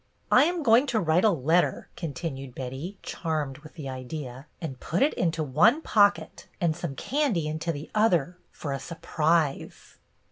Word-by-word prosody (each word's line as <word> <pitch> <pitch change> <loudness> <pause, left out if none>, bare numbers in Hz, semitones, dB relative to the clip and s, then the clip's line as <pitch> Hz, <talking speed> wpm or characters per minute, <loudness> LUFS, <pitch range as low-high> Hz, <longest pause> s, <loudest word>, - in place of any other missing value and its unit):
" - - -40
I 255 - +7
am 345 -1 -1
going 240 +3 +5
to 230 -4 +1
write 165 -1 +2
a 220 - +6
letter," 165 0 +1
continued 135 -5 -5
Betty, 135 +10 -6
charmed 155 -4 -3
with 155 +1 -14
the 150 -5 -7
idea, 130 +1 -7
"and 135 -7 -6
put 170 +9 0
it 295 - +2
into 165 -2 0
one 165 - +4
pocket, 205 -2 +2
and 170 -4 +1
some 170 -5 -5
candy 250 - 0
into 155 +2 -2
the 145 -1 -7
other, 180 -6 +2
for 145 -3 -5
a 135 - -3
surprise." 160 -2 -1
160 Hz, 170 wpm, -27 LUFS, 140-195 Hz, -, I